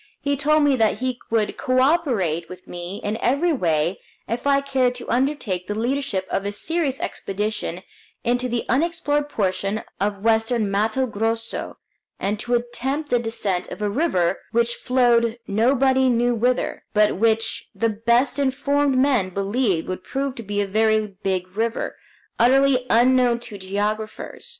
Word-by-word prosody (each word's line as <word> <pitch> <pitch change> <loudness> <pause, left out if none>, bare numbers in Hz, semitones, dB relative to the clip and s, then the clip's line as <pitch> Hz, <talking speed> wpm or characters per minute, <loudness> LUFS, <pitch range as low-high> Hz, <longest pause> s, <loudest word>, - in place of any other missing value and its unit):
He 285 0 0
told 300 +2 +3
me 285 -2 +4
that 220 -3 +2
he 255 +1 -2
would 225 -2 0
co 255 0 +1
operate 245 - +1
with 185 0 -11
me 175 +3 -6
in 210 +2 -1
every 305 +7 +2
way 170 - 0 0.3
if 240 +4 -3
I 280 0 +4
cared 265 -3 +1
to 245 - -7
undertake 240 -9 -1
the 205 - -3
leadership 240 -5 -1
of 195 - 0
a 200 - -2
serious 290 +5 -1
expedition 200 -3 -3 0.4
into 245 +1 0
the 235 -1 -2
unexplored 295 0 0
portion 195 -1 -1 0.2
of 200 0 -2
western 225 -1 +2
Matto 220 +6 +1
Grosso, 225 0 -3 0.4
and 205 +2 -1
to 240 +2 0
attempt 260 +5 -2
the 245 - +4
descent 210 -6 -1
of - - -8
a 210 -1 -1
river 195 - +1
which 235 +1 +2
flowed 240 -2 +2
nobody 260 +5 +3
knew 240 0 +2
whither, 245 +2 0
but 210 -2 +3
which 225 +1 +1
the 230 - +1
best 235 +5 +1
informed 280 0 +1
men 255 -8 +3
believed 195 -1 0
would 185 0 -4
prove 275 0 -2
to 235 - -8
be 205 -1 -2
a - - 0
very 215 0 +1
big 185 -2 -1
river, 230 +1 -1 0.4
utterly 255 +1 +4
unknown 245 0 +4
to 205 -4 -8
geographers. 210 - -3
230 Hz, 155 wpm, -22 LUFS, 205-260 Hz, 0.4 s, me